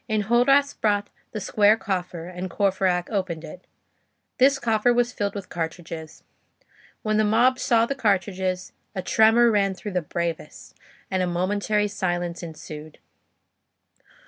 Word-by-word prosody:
Enjolras 240 +7 +3
brought 205 -1 0 0.2
the 215 - -4
square 210 +2 +3
coffer, 180 -5 -4
and 180 +1 -6
Courfeyrac 185 -2 0
opened 185 -6 -2
it. 170 +3 -11 0.7
This 275 +2 +5
coffer 225 -1 +2
was 240 0 +2
filled 205 0 -2
with 200 -2 -6
cartridges. 160 -1 -6 0.8
When 215 -1 +1
the 215 - +3
mob 240 +5 +3
saw 230 -3 +3
the 275 - -2
cartridges, 190 -6 -1 0.2
a 185 - -3
tremor 225 +4 +5
ran 195 -2 +1
through 205 +3 -7
the 180 - +1
bravest, 165 -1 -5 0.4
and 190 -1 +1
a 180 - +1
momentary 205 +4 0
silence 175 -3 -2
ensued. 155 -2 -9
195 Hz, 135 wpm, -24 LUFS, 180-220 Hz, 0.8 s, This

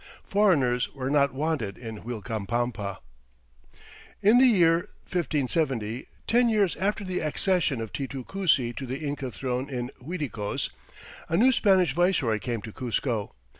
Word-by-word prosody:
Foreigners 140 -12 +2
were 135 0 -2
not 140 -2 +4
wanted 135 -8 -2
in 110 -3 -7
Uilcapampa. 110 -2 -3 1.3
In 215 +5 +6
the 260 - +7
year 170 -6 +4 0.2
1570, 135 - -1 0.2
ten 240 +1 +4
years 205 -5 +2
after 205 +3 0
the 185 -1 -2
accession 155 -3 0
of 110 -2 -6
Titu 135 -2 -4
Cusi 150 -11 +1
to 135 - -4
the 130 +2 -3
Inca 140 -2 -3
throne 125 +5 -3
in 125 -1 -4
Uiticos, 130 - -3 0.6
a 165 - +2
new 250 +6 +6
Spanish 190 -7 +3
viceroy 165 - +2
came 115 -3 -3
to 110 - -7
Cuzco. 120 -3 -2
135 Hz, 135 wpm, -27 LUFS, 120-180 Hz, 1.3 s, the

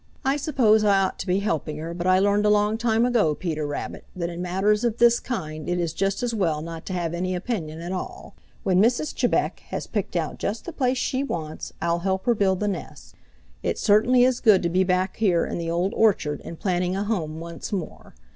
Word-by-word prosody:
I 270 +1 +3
suppose 255 -7 +3
I 200 -2 +4
ought 190 -1 -1
to - - -5
be 185 +2 +1
helping 160 -6 -2
her, 165 +2 -5
but 175 +1 -3
I 185 0 +5
learned 205 +2 +3
a - - +5
long 210 +1 +3
time 230 0 +2
ago, 225 -11 +2
Peter 155 -4 -3
Rabbit, 145 - -5
that 170 -1 -3
in 170 +1 -6
matters 195 +5 +1
of 235 -1 0
this 235 0 +5
kind 155 - -5
it 175 0 0
is 170 -2 -1
just 195 +5 -1
as 240 -1 -1
well 165 -8 0
not 165 -1 -8
to 185 - -3
have 170 -2 -2
any 185 +1 -1
opinion 175 -6 -4
at 175 +2 -5
all. 185 - -6 0.3
When 185 -1 +3
Mrs. 245 +7 +2
Chebec - - +1
has - - -4
picked 205 -4 -3
out 165 -3 -2
just 215 +3 -3
the 345 - -6
place 255 -3 +1
she 260 +2 -1
wants, 160 - -5
I'll 170 0 +1
help 190 +1 -1
her 240 - +4
build 195 -3 +1
the 210 - +1
nest. 200 - -6 0.5
It - - -1
certainly 235 +4 +4
is 255 -1 +3
good 210 -5 +5
to 170 - +1
be 185 +2 +2
back 185 0 0
here 185 -6 +2
in - - -4
the 165 -1 -3
Old 175 +3 0
Orchard 170 -9 +2
and 165 - -8
planning 180 -1 0
a 195 - -1
home 165 -8 -2
once 170 0 -7
more. 190 -5 -6
190 Hz, 230 wpm, -24 LUFS, 170-220 Hz, 0.5 s, I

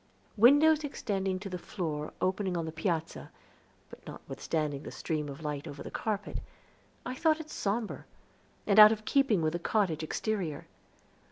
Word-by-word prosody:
Windows 290 +7 +6
extending 195 -9 -2
to 195 +2 -7
the 180 -2 -5
floor 155 -6 -4
opening 185 -1 0
on 165 - -2
the 160 - -4
piazza, 165 0 -3 0.6
but - - -13
notwithstanding 150 -4 -3
the - - -8
stream 150 -2 -3
of 140 +3 -9
light 145 -1 -4
over 140 - -8
the - - -8
carpet, 205 -2 -3 0.7
I - - -3
thought 315 +3 +2
it 310 -1 -9
somber, 215 +2 -3 0.6
and 205 0 +4
out 215 0 +11
of 215 -1 -3
keeping 250 - +2
with 155 0 +1
the 175 - -2
cottage 175 -4 0
exterior. 170 -2 -3
190 Hz, 160 wpm, -30 LUFS, 160-220 Hz, 0.7 s, out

